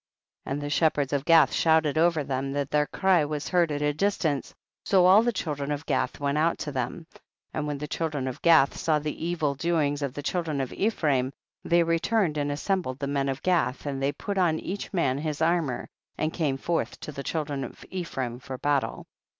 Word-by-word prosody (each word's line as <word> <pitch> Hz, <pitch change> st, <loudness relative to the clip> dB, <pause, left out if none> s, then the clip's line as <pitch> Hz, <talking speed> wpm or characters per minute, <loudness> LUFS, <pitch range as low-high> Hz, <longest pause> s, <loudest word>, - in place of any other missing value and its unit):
9. -, -, -1 dB
And 145 Hz, -, -3 dB
the 145 Hz, -, -3 dB
shepherds 145 Hz, -3 st, +2 dB
of 140 Hz, 0 st, 0 dB
Gath 165 Hz, -1 st, +6 dB
shout 160 Hz, -1 st, +4 dB
ed 150 Hz, -, -1 dB
over 160 Hz, -1 st, +3 dB
them 135 Hz, 0 st, -2 dB
that 140 Hz, -1 st, -2 dB
their 150 Hz, 0 st, +2 dB
cry 185 Hz, -4 st, +3 dB
was 150 Hz, 0 st, -3 dB
heard 175 Hz, -3 st, +2 dB
at 145 Hz, 0 st, -2 dB
a 150 Hz, 0 st, +2 dB
distance, 160 Hz, -4 st, 0 dB, 0.3 s
so 185 Hz, -3 st, +4 dB
all 190 Hz, +4 st, +7 dB
the 240 Hz, +1 st, +1 dB
children 150 Hz, -8 st, -3 dB
of 145 Hz, +2 st, -3 dB
Gath -, -, -1 dB
went 140 Hz, +1 st, 0 dB
out 165 Hz, +2 st, +2 dB
to 150 Hz, -, -4 dB
them. 135 Hz, +5 st, -3 dB
10. -, -, -19 dB, 0.3 s
And 150 Hz, -1 st, -2 dB
when 145 Hz, -1 st, -2 dB
the 150 Hz, +2 st, -5 dB
children 150 Hz, -4 st, -2 dB
of 130 Hz, -, -5 dB
Gath 160 Hz, -5 st, +5 dB
saw 155 Hz, -2 st, +1 dB
the 150 Hz, +1 st, -4 dB
evil 165 Hz, -4 st, 0 dB
doings 150 Hz, -1 st, 0 dB
of 140 Hz, -2 st, -3 dB
the 145 Hz, -, -5 dB
children 160 Hz, -2 st, -1 dB
of 130 Hz, -2 st, -3 dB
Ephraim, 145 Hz, -, +1 dB, 0.3 s
they 170 Hz, 0 st, +3 dB
returned 165 Hz, 0 st, +1 dB
and 145 Hz, 0 st, -1 dB
as 145 Hz, -, -4 dB
sembled 180 Hz, -10 st, 0 dB
the 140 Hz, -, -3 dB
men 140 Hz, -1 st, 0 dB
of 135 Hz, 0 st, -4 dB
Gath, 170 Hz, -8 st, +1 dB
and 135 Hz, -2 st, -3 dB
they 140 Hz, +1 st, +1 dB
put 200 Hz, +5 st, -3 dB
on 170 Hz, -4 st, +3 dB
each 200 Hz, +2 st, -5 dB
man 140 Hz, -8 st, +1 dB
his 150 Hz, -1 st, -3 dB
armour, 165 Hz, -5 st, 0 dB, 0.3 s
and 155 Hz, +1 st, -1 dB
came 145 Hz, -6 st, 0 dB
forth 170 Hz, +4 st, -2 dB
to -, -, -6 dB
the 140 Hz, -, -6 dB
children 145 Hz, -1 st, -3 dB
of 125 Hz, -, -9 dB
Ephraim 135 Hz, -10 st, -4 dB
for 130 Hz, 0 st, -7 dB
battle. 145 Hz, 0 st, -1 dB
150 Hz, 220 wpm, -27 LUFS, 140-170 Hz, 0.3 s, all